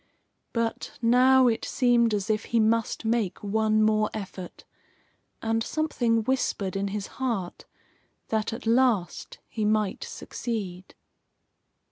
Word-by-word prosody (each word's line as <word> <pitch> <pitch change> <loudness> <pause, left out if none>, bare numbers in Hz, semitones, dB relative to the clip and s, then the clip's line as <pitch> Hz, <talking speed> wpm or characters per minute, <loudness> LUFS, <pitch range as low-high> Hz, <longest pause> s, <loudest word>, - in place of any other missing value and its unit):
But 230 -1 -3
now 255 +2 +5
it 225 -2 0
seemed 240 -3 +3
as 205 +2 -1
if 215 0 -1
he 235 - +1
must 225 +1 +1
make 220 -5 0
one 215 +1 +2
more 215 0 +2
effort, 190 -3 -8 0.8
and 225 0 +1
something 240 -6 0
whispered 215 -6 -1
in 195 0 -1
his 200 0 -3 0.2
heart 225 -9 -2 0.6
that, 220 0 0
at 230 - -7
last, 230 -6 +1
he 220 - -4
might 210 -1 +1
succeed. 190 -6 -6
220 Hz, 120 wpm, -26 LUFS, 210-235 Hz, 0.8 s, now